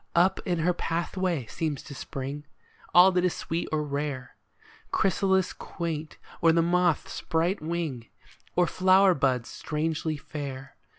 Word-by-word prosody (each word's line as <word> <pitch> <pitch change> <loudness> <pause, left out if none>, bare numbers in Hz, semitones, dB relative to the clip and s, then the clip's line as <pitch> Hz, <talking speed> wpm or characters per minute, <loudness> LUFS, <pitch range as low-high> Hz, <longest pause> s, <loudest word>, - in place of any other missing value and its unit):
Up 175 +3 +4
in 175 -1 +1
her 170 +2 +2
pathway 170 -3 -1
seems 155 +2 -3
to 145 - -9
spring 140 +2 -5 0.5
All 180 +2 +8
that 180 -1 +1
is 180 - +1
sweet 165 +1 -3
or 155 -1 0
rare, 140 -3 -4 0.5
â - - -35
Chrysalis 190 -1 +2
quaint, 160 -3 -5 0.2
or 165 - +6
the 165 0 +3
moth's 175 -1 +1
bright 170 +3 0
wing. 155 -8 -3 0.5
Or 180 - +4
flower 185 +2 +5
buds 130 -5 +1
strangely 155 0 -2
fair. 140 -2 -7
165 Hz, 140 wpm, -27 LUFS, 145-180 Hz, 0.5 s, All